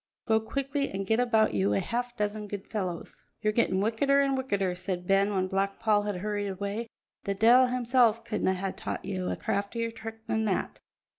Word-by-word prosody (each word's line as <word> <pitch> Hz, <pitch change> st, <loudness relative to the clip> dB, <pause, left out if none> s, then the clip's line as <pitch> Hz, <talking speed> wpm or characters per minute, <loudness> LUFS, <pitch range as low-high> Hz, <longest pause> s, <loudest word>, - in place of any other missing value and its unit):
Go 220 Hz, 0 st, +3 dB
quickly 275 Hz, +5 st, -2 dB
and 195 Hz, 0 st, -4 dB
get 220 Hz, +4 st, +2 dB
about 225 Hz, -3 st, +3 dB
you 100 Hz, 0 st, +2 dB
a -, -, +2 dB
half 245 Hz, -, -3 dB
dozen 210 Hz, 0 st, -2 dB
good 200 Hz, -1 st, -6 dB
fellows." 185 Hz, -6 st, -5 dB, 0.2 s
"Ye're 215 Hz, 0 st, +2 dB
gettin' 195 Hz, -4 st, +2 dB
wickeder 255 Hz, +7 st, +2 dB
and 275 Hz, -1 st, +2 dB
wickeder," 200 Hz, -8 st, 0 dB
said 180 Hz, 0 st, -4 dB
Ben 195 Hz, +2 st, +3 dB
when 190 Hz, -2 st, +1 dB
Black 195 Hz, +1 st, -1 dB
Paul 215 Hz, -2 st, +3 dB
had 205 Hz, -3 st, -3 dB
hurried 205 Hz, -1 st, -1 dB
away; 200 Hz, +4 st, -3 dB, 0.4 s
"the 200 Hz, -, -1 dB
de'il 240 Hz, +5 st, +6 dB
himsel' 245 Hz, -2 st, +3 dB
couldna 210 Hz, -4 st, 0 dB
hae 190 Hz, +1 st, -2 dB
taught -, -, -5 dB
ye 195 Hz, -1 st, -3 dB
a 185 Hz, -1 st, -2 dB
craftier 225 Hz, +4 st, -2 dB
trick 225 Hz, 0 st, -9 dB
than 220 Hz, 0 st, 0 dB
that. 195 Hz, -3 st, -1 dB
210 Hz, 195 wpm, -28 LUFS, 195-230 Hz, 0.4 s, de'il